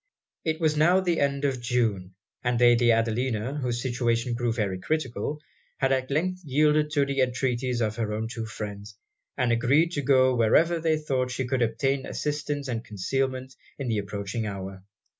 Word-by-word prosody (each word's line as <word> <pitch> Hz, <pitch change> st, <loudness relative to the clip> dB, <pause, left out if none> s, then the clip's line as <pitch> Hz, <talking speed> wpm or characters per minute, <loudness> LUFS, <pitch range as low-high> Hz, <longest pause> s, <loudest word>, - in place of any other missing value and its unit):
It 160 Hz, 0 st, -1 dB
was 155 Hz, -2 st, +2 dB
now 170 Hz, +5 st, +4 dB
the 175 Hz, -3 st, 0 dB
end 140 Hz, 0 st, 0 dB
of 130 Hz, -3 st, -1 dB
June; 110 Hz, -7 st, -1 dB, 0.3 s
and 120 Hz, -1 st, +1 dB
Lady 120 Hz, -1 st, +5 dB
Adelina, 115 Hz, +3 st, 0 dB
whose 120 Hz, -3 st, -2 dB
situation 120 Hz, -2 st, 0 dB
grew 120 Hz, 0 st, 0 dB
very 100 Hz, -5 st, -2 dB
critical, 145 Hz, +1 st, -2 dB, 0.4 s
had 135 Hz, -1 st, +1 dB
at 130 Hz, -1 st, 0 dB
length 185 Hz, +6 st, -1 dB
yielded 150 Hz, +1 st, +2 dB
to 145 Hz, -2 st, +3 dB
the 140 Hz, -1 st, 0 dB
entreaties 125 Hz, -1 st, 0 dB
of 110 Hz, -1 st, -1 dB
her 110 Hz, -1 st, -2 dB
two 115 Hz, -1 st, -5 dB
friends, 105 Hz, -1 st, -7 dB, 0.4 s
and 125 Hz, -2 st, +1 dB
agreed 135 Hz, +8 st, +3 dB
to 145 Hz, -, -2 dB
go 130 Hz, -1 st, +4 dB
wherever 160 Hz, +9 st, +3 dB
they 160 Hz, -1 st, +1 dB
thought 130 Hz, -4 st, -1 dB
she 130 Hz, +1 st, -2 dB
could 130 Hz, 0 st, -1 dB
obtain 130 Hz, +4 st, 0 dB
assistance 145 Hz, -1 st, -3 dB
and 115 Hz, -2 st, -3 dB
concealment 130 Hz, +5 st, -2 dB, 0.2 s
in 135 Hz, -3 st, -3 dB
the 110 Hz, -2 st, +1 dB
approaching 100 Hz, +2 st, -4 dB
hour. 95 Hz, -1 st, -6 dB
125 Hz, 170 wpm, -26 LUFS, 115-140 Hz, 0.4 s, Lady